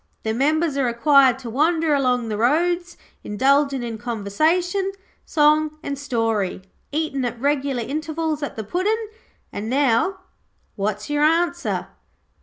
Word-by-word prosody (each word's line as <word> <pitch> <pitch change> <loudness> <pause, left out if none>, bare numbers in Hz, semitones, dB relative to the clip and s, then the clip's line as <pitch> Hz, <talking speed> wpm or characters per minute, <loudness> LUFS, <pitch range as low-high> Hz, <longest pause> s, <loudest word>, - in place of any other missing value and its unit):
The 220 - -1
members 300 +4 +1
are 275 - +2
required 260 +1 +4
to 255 -3 -8
wander 315 +4 +2
along 250 -4 +1
the 215 - -2
roads, 345 +9 +1 0.3
indulgin' 275 +4 +2
in 230 -2 -5
conversation, 320 - 0 0.3
song 305 0 +3
and 280 - -3
story, 225 -9 -1 0.3
eatin' 295 -3 -1
at 240 -1 -3
regular 275 -2 0
intervals 310 +2 -3
at 290 - -4
the 220 - -4
Puddin'. 415 - -1 0.4
And 210 +2 -4
now, 280 +8 +1 0.5
what's 205 0 -2
your 295 0 0
answer?' 340 +2 +1
280 Hz, 130 wpm, -22 LUFS, 240-320 Hz, 0.5 s, required